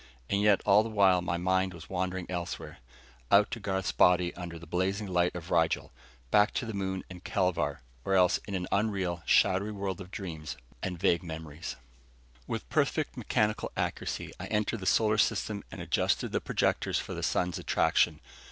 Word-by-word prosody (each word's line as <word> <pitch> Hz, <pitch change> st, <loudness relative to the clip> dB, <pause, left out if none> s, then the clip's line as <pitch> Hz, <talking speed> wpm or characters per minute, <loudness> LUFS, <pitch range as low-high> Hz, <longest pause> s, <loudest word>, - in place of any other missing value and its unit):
And 100 Hz, 0 st, +2 dB
yet 105 Hz, -1 st, +4 dB
all 105 Hz, +1 st, +6 dB
the 115 Hz, -, -4 dB
while 95 Hz, -4 st, +4 dB
my 85 Hz, 0 st, -1 dB
mind 95 Hz, +1 st, +1 dB
was 85 Hz, -1 st, -11 dB
wandering 95 Hz, -1 st, -2 dB
elsewhere 90 Hz, -1 st, -5 dB, 0.5 s
out 100 Hz, +1 st, +5 dB
to 120 Hz, -, -3 dB
Garth's 95 Hz, -2 st, -1 dB
body 90 Hz, -1 st, +4 dB
under 85 Hz, -1 st, -7 dB
the 85 Hz, -, -11 dB
blazing 95 Hz, +5 st, -1 dB
light 90 Hz, -2 st, +1 dB
of 85 Hz, -1 st, -7 dB
Rigel, 80 Hz, -2 st, +1 dB, 0.4 s
back 105 Hz, +1 st, +4 dB
to 125 Hz, -, -1 dB
the 110 Hz, -, -5 dB
moon 95 Hz, -1 st, -2 dB
and 90 Hz, -1 st, -11 dB
Kelvar, 90 Hz, -2 st, 0 dB, 0.2 s
or 95 Hz, -, +1 dB
else 90 Hz, -2 st, +4 dB
in 100 Hz, -, -3 dB
an 90 Hz, -1 st, -2 dB
unreal, 95 Hz, -4 st, 0 dB
shadowy 95 Hz, +3 st, +4 dB
world 100 Hz, -3 st, -4 dB
of 95 Hz, -, -9 dB
dreams 80 Hz, -6 st, -6 dB, 0.2 s
and 90 Hz, -1 st, -3 dB
vague 85 Hz, -, +3 dB
memories. 80 Hz, -2 st, -6 dB, 0.7 s
With -, -, -4 dB
perfect -, -, 0 dB
mechanical 105 Hz, 0 st, 0 dB
accuracy -, -, -3 dB
I -, -, -5 dB
entered 105 Hz, +1 st, 0 dB
the 95 Hz, -, -5 dB
solar 110 Hz, +1 st, +3 dB
system 105 Hz, 0 st, +1 dB
and -, -, -8 dB
adjusted -, -, 0 dB
the -, -, 0 dB
projectors -, -, 0 dB
for -, -, -4 dB
the -, -, -5 dB
sun's 90 Hz, -2 st, 0 dB
attraction. -, -, +2 dB
95 Hz, 180 wpm, -30 LUFS, 90-100 Hz, 0.7 s, all